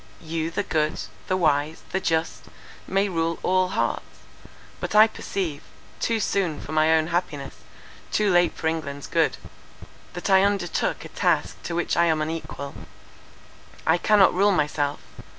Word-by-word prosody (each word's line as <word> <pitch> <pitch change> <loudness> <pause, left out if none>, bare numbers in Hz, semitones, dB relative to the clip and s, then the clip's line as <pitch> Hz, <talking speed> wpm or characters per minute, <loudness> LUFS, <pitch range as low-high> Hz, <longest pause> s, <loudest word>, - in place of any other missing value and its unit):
You 160 0 -3
the 185 +5 -2
good, 155 -5 0 0.3
the 185 - +1
wise, 155 -2 +1
the 190 - 0
just, 160 -2 -1 0.4
may 195 +1 +1
rule 165 -2 -1
all 185 0 +3
hearts. - - 0 0.8
But - - -4
I 215 +1 +9
perceive, 185 -8 -4 0.4
too 230 -1 0
soon 190 -6 0
for - - -8
my 155 0 +3
own 160 -1 +2
happiness, 160 -5 -3 0.5
too 210 -2 +2
late 175 0 +4
for - - -6
England's 145 -3 -2
good, - - +1 0.8
that 175 - -4
I 190 -1 +6
undertook 195 -4 0
a - - -9
task - - 0
to 170 - -3
which 175 - 0
I 170 - +4
am 160 -2 +2
unequal. 155 -3 -4 1.1
I 160 +2 +3
cannot 205 -1 +5
rule 200 +3 +4
myself. 150 -4 0
165 Hz, 150 wpm, -24 LUFS, 155-190 Hz, 1.1 s, I